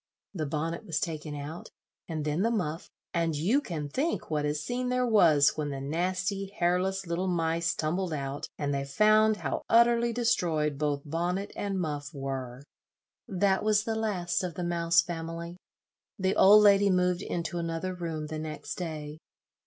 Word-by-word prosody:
The 155 -6 -3
bonnet 160 +5 -3
was 165 -8 -2
taken 155 -2 -4
out, 145 +4 -7 0.4
and 155 -3 -3
then 150 +3 0
the 225 - +2
muff, 175 -8 -2 0.2
and 165 -2 0
you 200 - +2
can 160 - -4
think 270 - -2
what 150 -1 0
a 150 0 0
scene 245 +11 -2
there 250 0 +1
was 165 - +5
when 150 -1 -2
the 135 -1 -4
nasty 185 +7 -1
hairless 185 +2 +1
little 170 +2 -2
mice 170 -1 0
tumbled 175 +3 -1
out, 140 0 -4
and 145 -1 -1
they 140 0 -1
found 215 +8 +4
how 150 -8 -3
utterly 235 0 +4
destroyed 165 - 0
both 145 -2 -1
bonnet 175 +6 -2
and 200 -2 -2
muff 150 -3 -4
were. 135 -2 -5 0.6
That 190 +1 +1
was 210 0 +3
the 225 - -2
last 205 -6 -1
of 175 -3 -4
the 180 - -3
Mouse 170 0 +3
family. 170 0 -6 0.6
The 190 0 0
old 210 +2 +8
lady 200 -1 +6
moved 180 -1 +2
into 175 -1 -3
another 165 +2 -3
room 165 -3 -4
the 155 0 -5
next 155 +2 -6
day. 155 -3 -5
170 Hz, 170 wpm, -29 LUFS, 150-195 Hz, 0.6 s, old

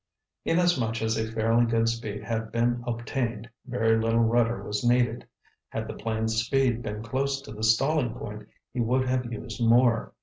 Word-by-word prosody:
Inasmuch 135 -11 +1
as 110 0 +1
a 110 0 -2
fairly 115 +1 +2
good 115 0 +2
speed 110 -3 -3
had 110 0 -3
been 120 +1 +1
obtained, 120 -1 -3 0.2
very 115 -3 +2
little 115 +1 +2
rudder 115 +1 +2
was 105 +2 -3
needed. 120 -1 +2 0.4
Had - - -4
the - - -5
plane's 110 0 -1
speed 125 -1 +1
been 105 -1 -5
close 135 +4 -1
to 135 - -11
the 110 0 -8
stalling 125 +2 +2
point, 105 -3 -8 0.3
he 125 - -3
would 125 +3 +1
have 125 -1 -1
used 115 0 -5
more. 115 0 +3
115 Hz, 170 wpm, -27 LUFS, 110-125 Hz, 0.4 s, more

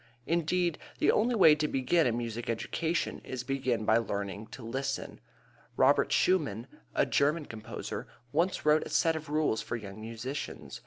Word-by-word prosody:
Indeed, 170 0 +1 0.2
the - - +4
only 240 +3 +2
way 165 -8 +8
to 150 0 0
begin 140 +4 +2
a - - +2
music 120 0 -4
education 160 +8 -1
is 130 -1 -5
to - - -13
begin 130 -4 -1
by 110 - +5
learning 100 -1 -4
to 120 +1 -10
listen. 135 +4 -3 0.6
Robert - - +4
Schumann, 145 - +2 0.3
a - - +4
German 150 +2 +1
composer, 110 -3 -6 0.2
once 170 +5 0
wrote 150 +1 +5
a - - -8
set 165 -1 +2
of 155 -1 -6
rules 150 -7 +1
for - - -4
young 105 -2 -8
musicians. 115 +6 -6
135 Hz, 165 wpm, -30 LUFS, 115-160 Hz, 0.6 s, way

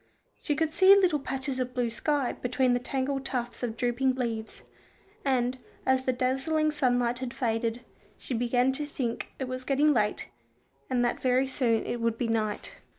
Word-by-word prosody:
She 295 - 0
could 315 +1 0
see 385 +3 +8
little 365 -7 +3
patches 265 -1 -3
of 250 0 -3
blue 245 -2 0
sky 285 +2 0
between 250 0 +1
the 245 - +2
tangled 270 +2 -2
tufts 245 -3 -3
of 230 -2 -3
drooping 255 +2 +1
leaves, 230 -3 -4 0.6
and, 255 -2 +1 0.3
as 260 0 +2
the 255 - +3
dazzling 270 +5 +1
sunlight 245 -4 +1
had 255 -2 -5
faded, 230 -2 -1 0.4
she - - -5
began 245 +2 +2
to 290 +2 -4
think 245 -5 -3
it 265 - -3
was 255 0 -4
getting 290 +3 +3
late, 210 - 0 0.6
and 245 -1 +2
that 240 - -1
very 255 +1 +3
soon 245 -4 0
it 240 - -3
would 230 -1 0
be 240 - -1
night. 215 -2 -1
255 Hz, 175 wpm, -28 LUFS, 240-270 Hz, 0.6 s, see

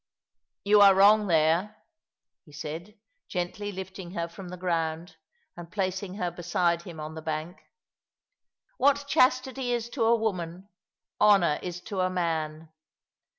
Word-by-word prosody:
"You 205 +1 +5
are 200 -1 +8
wrong 205 +2 +6
there," 170 +5 +2 0.7
he 150 - -19
said, 160 +8 -7 0.3
gently 185 +3 -3
lifting 190 -1 -8
her 170 0 -2
from 175 +2 -10
the 180 - -7
ground, 165 -1 -2 0.4
and 170 0 -10
placing 190 -1 -3
her 180 -4 -2
beside 175 0 0
him 170 -3 -10
on 155 +1 -6
the 160 - -7
bank. 155 +3 -5 0.6
" - - -48
What 285 +2 +3
chastity 255 -1 +2
is 235 -1 -2
to 240 - -1
a 230 +1 +5
woman, 185 -3 -3 0.5
honour 195 -7 +5
is 180 -1 -6
to 200 0 -5
a 185 0 +2
man. 160 -3 -2
180 Hz, 145 wpm, -27 LUFS, 170-205 Hz, 0.7 s, are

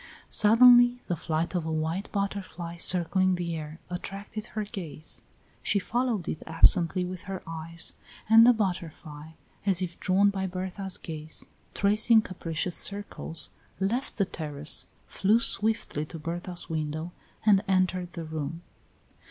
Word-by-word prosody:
Suddenly 245 +3 +7
the 175 - -1
flight 165 +2 -2
of 175 -3 -1
a 160 - -3
white 160 +5 -2
butterfly 190 -4 -4
circling 185 +2 +3
in 185 - +2
the 170 -1 -3
air 155 0 -7
attracted 200 +4 -6
her 215 - -3
gaze. 175 -7 -6 0.4
She - - +1
followed 230 -1 -1
it 155 - -4
absently 175 +2 +4
with 185 0 -7
her 190 -1 -5
eyes, 165 +1 -5 0.3
and 225 +1 +8
the 245 - +8
butterfly, 165 -7 -4 0.3
as 195 -3 +3
if 175 -1 -6
drawn 195 +2 +3
by 190 -1 -2
Berta's 185 +1 -4
gaze, 155 -1 -5 0.3
tracing 215 +2 +4
capricious 170 -2 -3
circles, 200 -5 -2 0.3
left 230 +8 -1
the 200 - +2
terrace, 150 -4 -1 0.2
flew 210 +4 +2
swiftly 215 -9 +1
to 165 - -8
Berta's 175 +2 -5
window 155 +1 -3 0.3
and 205 -2 +5
entered 185 -2 +1
the 165 -2 -6
room. 160 +2 -5
180 Hz, 140 wpm, -28 LUFS, 165-200 Hz, 0.4 s, and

